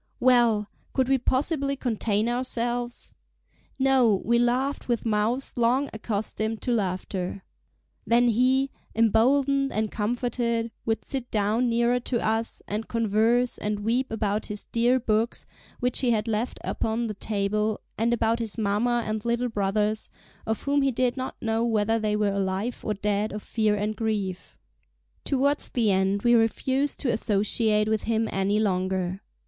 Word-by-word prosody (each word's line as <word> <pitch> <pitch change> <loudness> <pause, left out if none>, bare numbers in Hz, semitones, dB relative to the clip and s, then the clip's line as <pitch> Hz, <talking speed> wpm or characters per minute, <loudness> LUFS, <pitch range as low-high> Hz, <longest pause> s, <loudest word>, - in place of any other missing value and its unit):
Well! 235 -4 +4 0.3
Could 260 -1 +1
we 270 -1 +3
possibly 275 +2 0
contain 220 -4 -1
ourselves? 240 0 -2 0.6
No, 260 -6 +3
we 235 +1 +3
laughed 255 +4 0
with 240 -2 -1
mouths 225 +4 0
long 255 +4 +2
accustomed 220 0 -2
to 250 - 0
laughter. 190 -3 -2 0.6
Then 240 +1 +4
he, 260 +4 +2 0.2
emboldened 270 +5 +3
and 215 0 -1
comforted, 235 +1 -1 0.2
would 225 0 -1
sit 260 -3 -4
down 220 +4 +1
nearer 235 +1 +2
to 240 0 -2
us, 225 +1 -1
and 215 +2 -3
converse, 230 +2 +1
and 210 0 -2
weep 240 +5 0
about 210 -1 -1
his 210 -1 -4
dear 240 +2 +2
books, 225 0 0 0.3
which 250 -1 0
he 255 - +1
had 220 -1 +1
left 225 +2 -2
upon 225 +1 -1
the 215 - -3
table, 210 +1 -1 0.2
and 230 +2 +1
about 230 0 +1
his 225 -2 -4
mamma 230 +3 +1
and 215 0 -3
little 235 +1 0
brothers, 210 +1 0 0.4
of 220 -1 -2
whom 285 0 +2
he 275 - +3
did 250 0 0
not 260 -1 -4
know 225 0 0
whether 225 -1 +1
they 215 -1 0
were 210 -1 +1
alive 195 +4 -2
or 210 - -1
dead 205 +1 -1
of 210 0 -6
fear 215 -2 +1
and 210 +1 -2
grief. 205 -5 -3 0.7
Towards 280 +1 +1
the 225 -4 +1
end 195 +1 +1
we 240 0 +4
refused 260 +5 +1
to 250 - +1
associate 210 0 +2
with 220 -1 0
him 225 0 +1
any 195 +2 +1
longer. 185 -2 -1
225 Hz, 155 wpm, -26 LUFS, 210-245 Hz, 0.7 s, Well